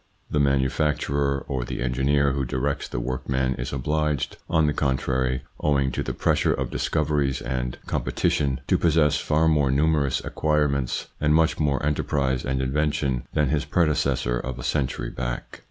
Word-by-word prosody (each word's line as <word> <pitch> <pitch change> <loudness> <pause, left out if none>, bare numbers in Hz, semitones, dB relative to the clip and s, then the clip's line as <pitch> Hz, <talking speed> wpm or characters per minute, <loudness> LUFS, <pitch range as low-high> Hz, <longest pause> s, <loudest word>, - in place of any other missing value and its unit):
The 75 - +1
manufacturer 70 0 +1
or 65 -3 -2
the - - -5
engineer 70 +3 +2
who 70 0 -1
directs 70 +3 -2
the - - -4
workman 65 +1 -1
is - - -3
obliged, 75 +1 -1
on 80 -1 +3
the 75 - +1
contrary, 65 -2 0 0.2
owing 70 -2 +1
to - - -2
the - - -3
pressure - - +2
of - - -3
discoveries 75 -3 0
and 60 -1 -3
competition, 70 -3 0
to - - +2
possess 75 -3 +3
far 80 +2 +1
more 75 -4 +3
numerous 70 0 +2
acquire 75 -1 +1
ments 70 -3 -2
and 75 0 +3
much 80 0 +2
more 70 -2 +1
enterprise 70 -3 0
and 65 0 -1
invention 70 -2 0
than 75 -3 +2
his 75 +1 +1
predecessor 75 -7 +1
of 65 +1 -5
a - - -7
century 70 -4 -1
back. - - -5
70 Hz, 160 wpm, -24 LUFS, 65-75 Hz, 0.2 s, on